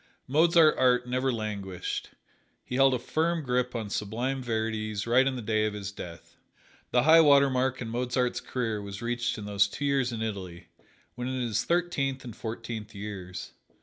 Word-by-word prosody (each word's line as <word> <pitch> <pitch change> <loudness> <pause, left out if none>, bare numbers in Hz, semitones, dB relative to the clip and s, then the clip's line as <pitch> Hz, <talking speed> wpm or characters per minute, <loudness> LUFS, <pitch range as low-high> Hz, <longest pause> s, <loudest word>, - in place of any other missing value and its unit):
Mozart's 160 +3 +5
art 125 -1 +3
never 130 +1 0
languished: 100 -5 -4 0.6
he - - -8
held 135 0 +5
a - - +1
firm 160 +6 -1
grip 125 -1 0
on 110 -3 -4
sublime 120 +7 -2
verities 110 -3 -2
right 120 +2 +5
to 135 - +2
the 130 -3 -5
day 110 0 +1
of 105 - -4
his 100 -1 -5
death. 85 -4 -10 0.5
The 125 - +3
high 160 +3 +8
water 140 -3 +6
mark 130 0 0
in 115 - -6
Mozart's 125 +1 -1
career 115 -5 -2
was 100 +1 -7
reached 120 0 -1
in 105 - -6
those 100 -1 +3
two 145 +7 -5
years 135 -3 +1
in 115 -1 -3
Italy, 95 -6 -6 0.4
when 125 +1 -5
in 130 0 -2
his 115 -4 0
thirteenth 140 -6 0
and 120 -4 -8
fourteenth 110 -1 -6
years. 95 -3 -7
120 Hz, 180 wpm, -28 LUFS, 105-130 Hz, 0.6 s, high